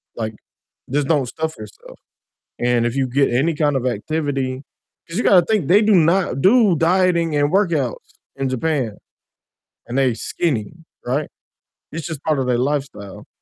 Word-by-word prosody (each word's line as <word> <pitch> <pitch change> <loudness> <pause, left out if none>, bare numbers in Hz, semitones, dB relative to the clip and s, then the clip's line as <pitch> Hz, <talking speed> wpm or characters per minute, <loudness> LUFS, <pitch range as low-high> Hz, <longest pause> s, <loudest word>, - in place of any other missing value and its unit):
like, 110 -1 -4 0.6
just 145 -1 0
don't 145 -6 +1
stuff 160 +4 -4
yourself, 105 -1 -12 0.6
and 120 -1 +2
if 120 - -2
you 135 -1 0
get 135 +1 +2
any 150 +7 +1
kind 145 -2 +1
of 130 -1 -1
activity 135 +2 -2 0.5
'Cause 165 - -7
you - - +1
gotta 180 -4 +5
think, 210 -10 0
they 205 +4 +5
do 210 -1 +4
not 170 -3 +2
do 210 -2 +5
dieting 170 -1 +2
and 145 +2 +1
workouts 165 - -1 0.2
in 135 -1 -2
Japan, 130 -4 -1 0.9
and 120 +2 -5
they 130 -3 +3
skinny, 135 -4 -2 0.3
right? 140 +4 -1 0.6
It's 165 0 -5
just 160 -4 -6
part 155 -4 +1
of 130 - -1
their 120 -1 +1
lifestyle. 135 -8 -3
145 Hz, 160 wpm, -20 LUFS, 125-165 Hz, 0.9 s, gotta